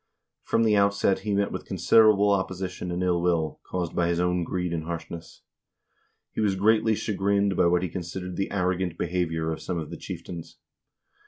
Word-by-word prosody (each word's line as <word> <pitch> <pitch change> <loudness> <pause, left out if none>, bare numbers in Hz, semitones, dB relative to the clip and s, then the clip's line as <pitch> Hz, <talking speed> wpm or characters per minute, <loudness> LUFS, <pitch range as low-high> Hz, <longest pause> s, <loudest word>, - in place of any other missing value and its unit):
From 115 - +1
the 110 -2 +3
outset 100 -1 +2
he 105 0 -2
met 100 0 +1
with - - -6
considerable 105 +3 +4
opposition 95 -2 -2
and 90 +1 -2
ill 90 -1 +1
will, 85 -4 0
caused 90 -2 -4
by 85 - +2
his 85 0 0
own 90 0 +1
greed 90 0 -2
and 80 -1 -3
harshness. 85 0 -7 0.9
He - - -3
was 100 -3 +2
greatly 110 +2 +3
chagrined 100 -1 0
by 85 - +4
what 90 +1 +2
he - - 0
considered 90 +1 -5
the 95 - -2
arrogant 90 -3 -1
behavior 80 -2 -1
of 80 - -5
some 90 - -3
of 80 -2 -5
the - - -6
chieftains. 85 -2 -8
90 Hz, 180 wpm, -26 LUFS, 85-100 Hz, 0.9 s, considerable